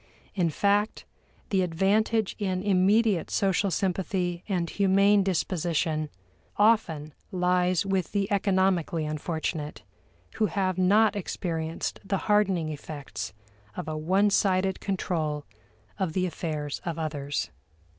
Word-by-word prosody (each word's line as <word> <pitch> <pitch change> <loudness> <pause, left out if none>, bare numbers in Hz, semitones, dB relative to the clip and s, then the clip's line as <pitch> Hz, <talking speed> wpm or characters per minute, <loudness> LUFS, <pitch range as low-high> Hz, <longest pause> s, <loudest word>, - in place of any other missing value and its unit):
In 175 -4 +1
fact, 205 +6 +1 0.5
the 190 -2 +3
advantage 200 +5 +1
in 185 -2 -1
immediate 200 0 +3
social 195 0 +1
sympathy 180 -1 -1
and 175 -3 0
humane 200 +2 +4
disposition 165 -4 0 0.5
often 170 -9 +2 0.2
lies 180 0 +2
with 190 -2 -1
the 200 -1 0
economically 190 -5 +1
unfortunate, 155 -3 -3 0.5
who 220 -1 +3
have 185 -1 -1
not 205 +3 +4
experienced 165 -4 -3
the 195 0 -1
hardening 195 -6 +2
effects 145 - -6 0.4
of - - -4
a 155 - -3
one 190 +7 +2
sided 190 -1 +2
control 160 -6 -2 0.5
of 185 -5 -1
the 185 +1 +1
affairs 155 -4 -4
of 170 -2 -3
others. 145 - -3
185 Hz, 115 wpm, -27 LUFS, 160-195 Hz, 0.5 s, humane